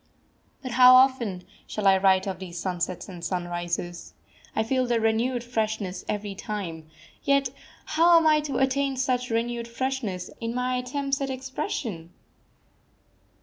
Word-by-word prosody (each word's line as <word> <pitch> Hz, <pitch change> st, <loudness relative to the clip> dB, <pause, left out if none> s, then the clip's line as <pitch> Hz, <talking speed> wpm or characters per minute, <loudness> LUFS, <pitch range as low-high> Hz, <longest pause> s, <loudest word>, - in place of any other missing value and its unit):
But 255 Hz, -, -5 dB
how 250 Hz, +1 st, +8 dB
often 255 Hz, -8 st, +3 dB, 0.2 s
shall 210 Hz, -, -4 dB
I 195 Hz, -1 st, +7 dB
write 190 Hz, 0 st, +3 dB
of 190 Hz, -3 st, -4 dB
these 180 Hz, -2 st, -7 dB
sunsets 180 Hz, 0 st, -3 dB
and 180 Hz, -4 st, -9 dB
sunrises? 175 Hz, -1 st, -4 dB, 0.4 s
I 220 Hz, -, +2 dB
feel 255 Hz, +2 st, 0 dB
their 240 Hz, -1 st, +2 dB
renewed 230 Hz, +2 st, +1 dB
freshness 220 Hz, -5 st, -2 dB
every 205 Hz, -1 st, -3 dB
time; 185 Hz, -6 st, -5 dB, 0.4 s
yet 280 Hz, -2 st, +2 dB, 0.4 s
how 335 Hz, +2 st, +5 dB
am 330 Hz, -, +3 dB
I 305 Hz, -1 st, +5 dB
to 295 Hz, -2 st, -3 dB
attain 270 Hz, 0 st, +1 dB
such 255 Hz, -1 st, 0 dB
renewed 235 Hz, +1 st, -1 dB
freshness 235 Hz, -6 st, -3 dB
in 230 Hz, +1 st, -3 dB
my 250 Hz, 0 st, 0 dB
attempts 275 Hz, +2 st, -2 dB
at 275 Hz, -, -1 dB
expression? 260 Hz, -, -4 dB
235 Hz, 145 wpm, -26 LUFS, 190-260 Hz, 0.4 s, how